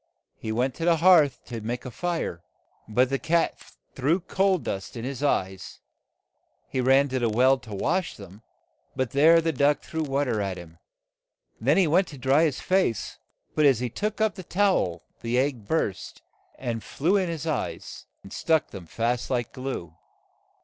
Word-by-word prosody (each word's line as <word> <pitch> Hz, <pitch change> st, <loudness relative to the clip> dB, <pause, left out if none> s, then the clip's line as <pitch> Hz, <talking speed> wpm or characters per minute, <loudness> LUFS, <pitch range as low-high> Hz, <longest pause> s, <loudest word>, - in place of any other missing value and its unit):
He 110 Hz, -, -4 dB
went 125 Hz, +4 st, 0 dB
to 165 Hz, -, -2 dB
the 170 Hz, -1 st, +5 dB
hearth 160 Hz, -5 st, +4 dB
to 115 Hz, -2 st, -6 dB
make 120 Hz, +4 st, -4 dB
a 130 Hz, -, -6 dB
fire, 165 Hz, -, -3 dB, 0.5 s
but 125 Hz, +4 st, +2 dB
the 135 Hz, -, 0 dB
cat 165 Hz, +1 st, +1 dB, 0.3 s
threw 145 Hz, +7 st, +1 dB
coal 190 Hz, +1 st, +1 dB
dust 100 Hz, -, -5 dB
in 115 Hz, -, -5 dB
his 135 Hz, 0 st, -5 dB
eyes. 95 Hz, -, -1 dB, 0.9 s
He 130 Hz, -, -2 dB
ran 135 Hz, +2 st, +4 dB
to 130 Hz, 0 st, -1 dB
the 120 Hz, -2 st, +1 dB
well 130 Hz, +4 st, +4 dB
to 110 Hz, -5 st, -9 dB
wash 180 Hz, -, -1 dB
them, 100 Hz, +1 st, -12 dB, 0.5 s
but 130 Hz, -3 st, -1 dB
there 160 Hz, +4 st, +6 dB
the 165 Hz, 0 st, 0 dB
duck 145 Hz, 0 st, +2 dB
threw 160 Hz, -, -4 dB
wa 140 Hz, -1 st, 0 dB
ter 115 Hz, -6 st, -1 dB
at 95 Hz, -2 st, -3 dB
him. 85 Hz, -1 st, -12 dB, 0.8 s
Then 135 Hz, +9 st, +2 dB
he 190 Hz, -, +5 dB
went 175 Hz, +4 st, +3 dB
to 145 Hz, -, -10 dB
dry 135 Hz, +5 st, +3 dB
his 145 Hz, -5 st, -1 dB
face, 185 Hz, -, 0 dB, 0.3 s
but 150 Hz, -1 st, +4 dB
as 135 Hz, -5 st, +4 dB
he 125 Hz, -2 st, -3 dB
took 210 Hz, -, -3 dB
up 220 Hz, -3 st, +2 dB
the 185 Hz, -, -9 dB
tow 195 Hz, +2 st, +2 dB
el, 85 Hz, -1 st, -9 dB, 0.2 s
the 120 Hz, +1 st, -1 dB
egg 130 Hz, -5 st, -1 dB
burst, 135 Hz, -, -2 dB, 0.3 s
and 115 Hz, -3 st, -4 dB
flew 170 Hz, +8 st, 0 dB
in 190 Hz, -3 st, +1 dB
his 165 Hz, -2 st, -4 dB
eyes, 155 Hz, -5 st, -4 dB, 0.2 s
and 95 Hz, -, -11 dB
stuck 160 Hz, -2 st, +1 dB
them 95 Hz, -4 st, -9 dB
fast 120 Hz, +6 st, -1 dB
like 120 Hz, -3 st, -2 dB
glue. 130 Hz, -, -5 dB
135 Hz, 185 wpm, -26 LUFS, 115-165 Hz, 0.9 s, there